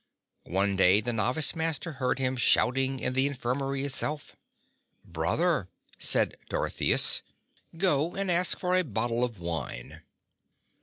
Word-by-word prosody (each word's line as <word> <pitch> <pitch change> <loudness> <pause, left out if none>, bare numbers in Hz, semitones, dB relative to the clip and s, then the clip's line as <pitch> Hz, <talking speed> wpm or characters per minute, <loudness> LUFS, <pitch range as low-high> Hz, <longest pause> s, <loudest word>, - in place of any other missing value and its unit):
One 100 +2 0
day 95 +1 +4
the 120 +2 -2
Novice 125 +9 +3
Master 160 +1 -2
heard 130 -2 -2
him 130 -1 -1
shouting 130 +2 +2
in 125 - -2
the 130 +2 +2
infirmary 135 +1 -3
itself. 145 +2 -3 0.7
"Brother," 95 - -1 0.3
said - - +2
Dorotheus, - - +2 0.6
"go 170 -2 +1
and 195 -2 0
ask 175 +1 +3
for 180 0 -1
a 185 - +3
bottle 115 - -1
of 120 -3 -3
wine." 80 -8 -6
130 Hz, 125 wpm, -28 LUFS, 110-155 Hz, 0.7 s, day